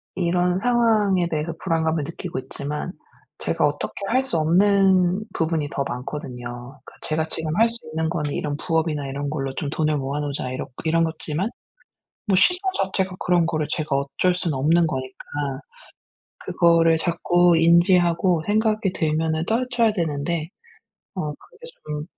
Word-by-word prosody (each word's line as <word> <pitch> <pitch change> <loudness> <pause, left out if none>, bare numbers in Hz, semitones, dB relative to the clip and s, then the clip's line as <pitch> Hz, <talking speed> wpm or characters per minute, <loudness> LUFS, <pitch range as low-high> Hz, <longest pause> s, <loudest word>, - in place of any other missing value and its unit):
이런 180 0 +1
상황에 215 -6 +2
대해서 160 +1 -2
불안감을 160 -3 0
느끼고 165 -1 -5
있지만 150 +6 -5 0.5
제가 - - 0
어떻게 - - -2
할 255 +5 +2
수 215 -11 -1
없는 190 +3 +3
부분이 160 -3 -1
더 140 - -2
많거든요. 125 0 -7
그 - - -13
제가 155 +1 -1
지금 160 0 -3
할 230 +1 +5
수 235 - -4
있는 160 0 -1
거는 150 -4 -2
이런 145 -1 -2
부업이나 160 -3 -1
이런 140 +1 -3
걸로 135 -3 -3
좀 145 - -3
돈을 155 0 0
모아 140 +1 -3
놓자 140 -3 -3
이렇 130 - -4 0.2
이런 165 +1 +2
거지만 160 +5 -3 0.8
뭐 200 -4 +2
시간 360 - +4 0.2
자체가 190 -1 -2
그런 175 -2 +2
거를 155 -2 -1
제가 155 -3 -1
어쩔 140 +6 0
수는 165 -6 -1
없는 165 +5 +3
거니까 130 -3 -5 1.1
그거를 165 -1 +3
자꾸 175 +1 +3
인지하고 170 0 +4
생각이 215 -2 +1
들면은 160 0 0
떨쳐야 235 0 +1
되는데 160 -2 -2 0.7
어 155 -5 -2
그게 280 - -16 0.3
좀 150 0 -4
165 Hz, 315 characters per minute, -23 LUFS, 150-185 Hz, 1.1 s, 할